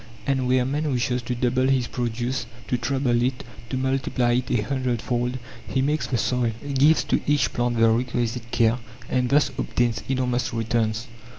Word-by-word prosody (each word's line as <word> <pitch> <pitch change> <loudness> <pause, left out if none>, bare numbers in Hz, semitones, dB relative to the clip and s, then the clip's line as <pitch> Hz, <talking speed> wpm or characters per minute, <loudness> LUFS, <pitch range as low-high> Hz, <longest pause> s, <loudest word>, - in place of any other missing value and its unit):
And 135 -2 +1
where 125 0 +3
man 145 +3 -1
wishes 125 0 0
to 125 +1 -3
double 125 +1 +1
his 135 -2 +2
produce, 120 +1 -2 0.2
to - - +2
treble 120 0 +1
it, 125 +1 -1 0.3
to 130 - -2
multiply 130 -2 0
it 125 +2 0
a 120 - +2
hundred 130 -2 -1
fold, 125 +2 -1 0.3
he 130 - +1
makes 150 +2 0
the 125 - 0
soil, 120 0 0 0.2
gives 145 +4 +5
to - - 0
each 145 -3 +2
plant 120 -1 0
the 115 0 +5
requisite 120 0 0
care, 115 +1 +2 0.3
and 125 -1 +1
thus 145 +1 +3
obtains 120 -3 0
enormous 125 -2 0
returns. 115 0 0
125 Hz, 175 wpm, -24 LUFS, 120-130 Hz, 0.3 s, gives